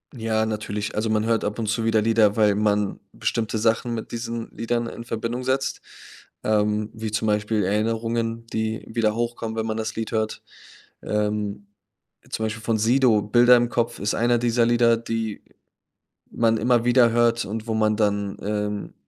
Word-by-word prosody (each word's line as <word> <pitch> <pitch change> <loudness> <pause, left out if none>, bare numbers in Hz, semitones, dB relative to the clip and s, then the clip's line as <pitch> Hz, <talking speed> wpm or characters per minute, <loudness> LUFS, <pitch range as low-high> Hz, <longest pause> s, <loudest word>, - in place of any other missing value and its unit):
Ja, 110 -2 0
natürlich, 105 -1 -3
also, 110 +1 0
man 110 0 +1
hört 115 -1 +1
ab 105 +2 -3
und 110 - -2
zu 115 +1 -1
wieder 115 -1 +3
Lieder, 110 -2 +3
weil 105 -2 +3
man 105 -1 0
bestimmte 110 -1 -2
Sachen 115 +2 +1
mit 110 -1 -5
diesen 115 -1 -4
Liedern 120 0 -2
in 115 - -7
Verbindung 115 +2 -3
setzt, 130 +1 -1 0.6
ähm, 105 0 +1
wie 110 -1 -5
zum 110 +1 -1
Beispiel 105 0 +1
Erinnerungen, 115 +3 -1
die 110 0 -3
wieder 110 -2 0
hochkommen, 115 -1 -3
wenn 110 0 -2
man 110 0 -2
das 110 -1 -3
Lied 115 -1 -4
hört, 110 -1 -2 0.6
ähm, 105 -1 -2 0.6
zum 110 - -2
Beispiel 110 0 -4
von 115 -1 +1
Sido, 115 -1 +4
„Bilder 120 +4 +5
im 120 0 +1
Kopf“ 120 0 -1
ist 105 +2 -1
einer 120 0 +2
dieser 120 0 +2
Lieder, 120 0 +4
die 115 -2 -4 0.9
man 115 -1 +2
immer 120 0 +2
wieder 120 -1 +5
hört 120 0 +2
und 110 +2 -5
wo 110 - -1
man 110 -1 +1
dann, 100 -2 0
ähm, 105 0 -3
110 Hz, 175 wpm, -24 LUFS, 105-115 Hz, 0.9 s, Bilder